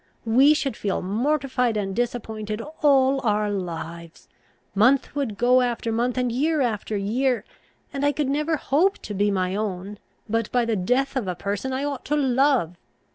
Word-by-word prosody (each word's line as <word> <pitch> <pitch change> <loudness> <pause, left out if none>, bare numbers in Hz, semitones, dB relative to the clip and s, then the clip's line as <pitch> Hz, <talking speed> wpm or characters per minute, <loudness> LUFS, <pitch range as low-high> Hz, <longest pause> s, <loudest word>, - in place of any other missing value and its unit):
We 265 +7 +5
should 275 -6 -2
feel 200 -3 -2
mortified 250 +2 0
and 195 -2 -2
disappointed 220 -3 -3 0.2
all 270 -2 +4
our 210 -2 +1
lives. 170 -3 -6 0.5
Month 250 +9 +3
would 260 -8 -2
go 250 +2 +4
after 235 -2 -1
month, 240 +3 0
and 250 -1 0
year 300 +6 +1
after 220 -3 -1
year, 235 +3 0 0.5
and 275 0 -3
I 290 - +4
could 290 -1 -1
never 300 +4 0
hope 350 +9 +2
to 210 - -5
be 205 +1 +1
my 185 -1 0
own, 205 -1 -4 0.3
but 225 0 -1
by 245 -1 +2
the 230 -1 0
death 250 +9 0
of 250 -7 -1
a 180 - -2
person 200 +7 -3
I 260 +2 -2
ought 285 -3 -3
to 295 - 0
love. 265 - +2
240 Hz, 175 wpm, -24 LUFS, 205-270 Hz, 0.5 s, We